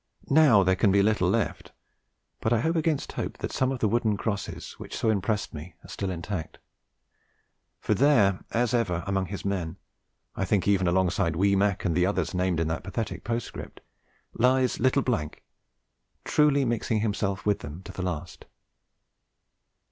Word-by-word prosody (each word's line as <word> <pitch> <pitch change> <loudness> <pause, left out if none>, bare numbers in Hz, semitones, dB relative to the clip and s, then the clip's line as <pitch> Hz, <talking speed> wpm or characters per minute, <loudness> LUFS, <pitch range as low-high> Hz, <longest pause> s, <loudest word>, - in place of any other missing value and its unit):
Now 135 -9 +6
there 95 0 +3
can 100 +1 +3
be 100 0 +4
little 110 +1 +2
left; - - -2 0.7
but 110 - -1
I 115 -2 +3
hope 165 +4 0
against 160 -3 0
hope - - -4
that - - -4
some 130 0 0
of 135 - -2
the 110 - +3
wooden 110 -1 +1
crosses 100 -2 -4
which - - -7
so 110 - +2
impressed 105 +1 -1
me 80 +3 -9
are - - -13
still 100 - -3
intact. 85 -1 -5 1.2
For - - 0
there 115 -10 +4
as 120 0 0
ever 95 -8 0
among 95 -1 -1
his 100 +2 -6
men, 95 -3 -2 0.6
I - - -2
think 95 0 +1
even 95 -3 +3
alongside 90 -1 +1
'wee 100 +3 +3
Mac' 100 0 +1
and 85 - +1
the 90 +1 +3
others 95 -4 -1
named 90 -2 0
in 80 - 0
that 80 0 -3
pathetic 95 -1 -4
postscript, 115 0 -5 0.5
lies 130 +1 +2
'little 130 +3 +2 0.9
', - - -48
truly 145 -2 +3
'mixing 115 -2 0
himself 100 -3 -2
with 105 -1 +2
them' 75 +5 -9
to - - -9
the - - -6
last. 90 -2 -5
100 Hz, 170 wpm, -27 LUFS, 90-115 Hz, 1.2 s, Now